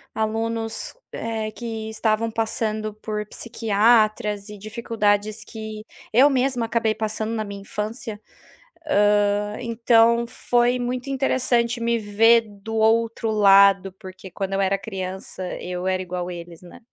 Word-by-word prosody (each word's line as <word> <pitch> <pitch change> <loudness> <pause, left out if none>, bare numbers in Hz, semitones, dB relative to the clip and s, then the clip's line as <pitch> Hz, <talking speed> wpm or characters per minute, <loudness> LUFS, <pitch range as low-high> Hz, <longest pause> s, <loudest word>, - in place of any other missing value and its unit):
alunos, 225 - -2 0.2
ah, 220 -1 -3
que 225 -2 -5
estavam 220 0 0
passando 215 -1 -2
por 210 0 -5
psiquiatras 215 -2 +1
e 210 0 -9
dificuldades 215 -1 -1
que 220 -1 -8 0.3
eu 270 +5 +7
mesma 255 -3 0
acabei 225 -2 0
passando 220 0 -2
na 215 - -1
minha 200 -1 -7
infância. 215 +2 -5 0.7
Ah, 205 0 +2
então 235 0 +3
foi 245 +1 +1
muito 250 +2 -3
interessante 245 -3 +1
me 235 0 +1
ver 225 +3 +5
do 205 +2 -8
outro 225 0 +2
lado, 195 -2 +5
porque 185 -2 -11
quando 195 -1 -4
eu 195 - +1
era 195 0 +2
criança, 190 -2 -6 0.2
eu 180 0 -5
era 185 0 0
igual 180 0 -4
eles, 170 -1 -9
né. 180 +7 -13
220 Hz, 130 wpm, -23 LUFS, 205-230 Hz, 0.7 s, eu